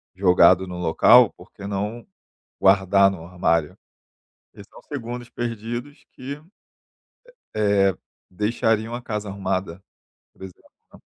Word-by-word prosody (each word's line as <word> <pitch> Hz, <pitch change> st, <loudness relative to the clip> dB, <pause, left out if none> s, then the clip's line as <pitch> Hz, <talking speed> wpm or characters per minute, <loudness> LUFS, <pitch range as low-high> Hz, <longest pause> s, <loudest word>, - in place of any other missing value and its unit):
jogado 90 Hz, 0 st, +4 dB
no 90 Hz, -1 st, -7 dB
local, 110 Hz, +7 st, +5 dB
por -, -, -16 dB
que 100 Hz, -, -10 dB
não 105 Hz, +4 st, -4 dB, 0.6 s
guardar 100 Hz, 0 st, +4 dB
no 85 Hz, -4 st, -8 dB
armário? 85 Hz, -3 st, -1 dB, 0.8 s
E -, -, -14 dB
são -, -, -16 dB
segundos 120 Hz, -3 st, -7 dB
perdidos 120 Hz, +4 st, -6 dB
que, 140 Hz, +3 st, -8 dB, 1.2 s
eh, 100 Hz, -3 st, +2 dB, 0.3 s
deixariam 110 Hz, +3 st, -1 dB
a 125 Hz, -, -6 dB
casa 105 Hz, -3 st, -5 dB
arrumada, 95 Hz, -2 st, -4 dB, 0.5 s
por -, -, -19 dB
exemplo, 95 Hz, -2 st, -11 dB, 0.3 s
né. -, -, -16 dB
100 Hz, 120 wpm, -22 LUFS, 95-115 Hz, 1.2 s, local